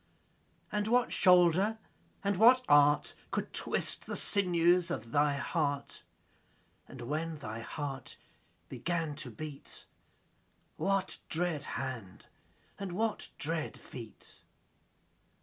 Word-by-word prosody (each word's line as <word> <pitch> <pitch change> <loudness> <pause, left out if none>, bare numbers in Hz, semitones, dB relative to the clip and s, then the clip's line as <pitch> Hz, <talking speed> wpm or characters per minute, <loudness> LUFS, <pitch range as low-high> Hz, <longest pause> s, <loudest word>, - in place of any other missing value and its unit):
And 210 0 0
what 245 +2 +2
shoulder 180 +3 +5 0.5
and 200 0 +1
what 245 +6 +6
art 145 0 +5 0.2
Could - - -3
twist - - -1
the - - -3
sinews 175 -3 +3
of 115 -9 -4
thy 145 0 +3
heart? 145 -2 -2 0.9
10 130 - -10
And 120 - -6
when 160 +2 -2
thy 115 -5 -6
heart 135 +1 -6 0.5
began 165 -3 -2
to 150 -5 -5
beat, 145 +5 -9 0.9
What 195 -1 0
dread 160 -4 -1
hand 125 -9 -6 0.5
and 195 -3 -4
what 220 +3 -1
dread 160 +1 -3
feet? 115 -4 -11
165 Hz, 110 wpm, -32 LUFS, 140-185 Hz, 0.9 s, what